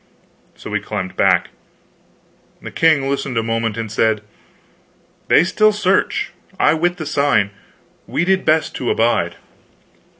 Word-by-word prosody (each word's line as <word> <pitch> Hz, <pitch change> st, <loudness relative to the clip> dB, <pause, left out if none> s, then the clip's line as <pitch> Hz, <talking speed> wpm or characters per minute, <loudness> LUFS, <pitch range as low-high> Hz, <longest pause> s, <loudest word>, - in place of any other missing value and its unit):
So -, -, -10 dB
we -, -, 0 dB
climbed 95 Hz, 0 st, -5 dB
back. -, -, +2 dB, 1.1 s
The -, -, -9 dB
king 155 Hz, -4 st, +2 dB
listened 135 Hz, -2 st, -2 dB
a 115 Hz, -, +1 dB
moment 115 Hz, -1 st, -2 dB
and 115 Hz, -2 st, -4 dB
said: 110 Hz, -1 st, +1 dB, 1.1 s
"They -, -, +5 dB
still 215 Hz, +4 st, +3 dB
search 205 Hz, -2 st, 0 dB, 0.3 s
I 150 Hz, -, +4 dB
wit 175 Hz, +2 st, 0 dB
the 155 Hz, -, -5 dB
sign. 140 Hz, -9 st, +1 dB, 0.6 s
We 175 Hz, -, -1 dB
did 190 Hz, 0 st, +2 dB
best 155 Hz, 0 st, +1 dB
to 125 Hz, -, -3 dB
abide." 110 Hz, -7 st, +1 dB
140 Hz, 135 wpm, -18 LUFS, 115-165 Hz, 1.1 s, They